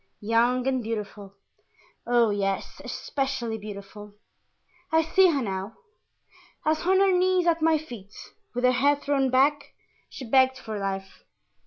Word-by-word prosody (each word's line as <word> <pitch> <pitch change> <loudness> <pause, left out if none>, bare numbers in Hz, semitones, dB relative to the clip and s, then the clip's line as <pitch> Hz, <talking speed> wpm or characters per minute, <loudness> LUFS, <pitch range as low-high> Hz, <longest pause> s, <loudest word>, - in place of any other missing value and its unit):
"Young 235 +4 +1
and 260 -1 0
beautiful. 210 -3 -6 0.7
Oh, 240 -2 +3
yes, 195 -1 -3
especially 265 -5 -3
beautiful. 205 0 -10 0.8
I 320 0 +4
see 370 +4 +4
her 285 -5 0
now, 195 +1 -4 0.9
as 310 +2 0
on 380 0 +4
her 390 -1 +4
knees 365 0 +2
at 335 -1 +2
my 320 0 +4
feet, 235 -10 -10 0.4
with 245 - -2
her 250 - +5
head 285 +3 +2
thrown 275 -2 +1
back, 285 +3 +1 0.3
she 260 - -9
begged 260 +2 +4
for 220 -4 -6
life. 195 -1 -5
250 Hz, 140 wpm, -26 LUFS, 210-290 Hz, 0.9 s, her